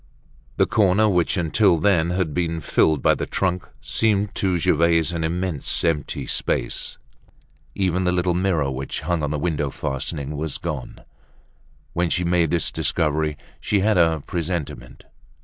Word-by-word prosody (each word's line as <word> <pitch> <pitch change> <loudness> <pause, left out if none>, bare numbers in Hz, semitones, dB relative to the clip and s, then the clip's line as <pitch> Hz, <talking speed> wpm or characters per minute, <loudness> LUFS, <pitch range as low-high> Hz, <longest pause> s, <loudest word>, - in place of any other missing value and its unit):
The - - +4
corner 105 -1 +3
which 90 -1 +1
until 90 +2 +3
then 85 -1 +2
had 90 -4 -1
been 85 -1 -1
filled 80 -2 +2
by - - +5
the - - -3
trunk 90 -2 -1
seemed 105 -2 +1
to 95 -2 0
Gervaise 85 0 +2
an 85 -2 -3
immense 85 -2 -1
empty 75 -4 -1
space. - - -2 0.8
Even 95 -1 0
the 90 - +2
little 90 0 +1
mirror 85 -6 +1
which 65 +1 -4
hung 85 -2 -1
on 75 - -1
the 75 - -1
window 75 -2 -1
fastening 70 +2 -4
was 75 0 -3
gone. - - -6 0.9
When 85 0 0
she 90 - 0
made 85 -2 +2
this 85 +1 +1
discovery, 75 0 0 0.2
she 100 - 0
had 105 -2 +3
a 80 -3 +2
presentiment. 75 -7 -4
85 Hz, 150 wpm, -22 LUFS, 75-90 Hz, 0.9 s, by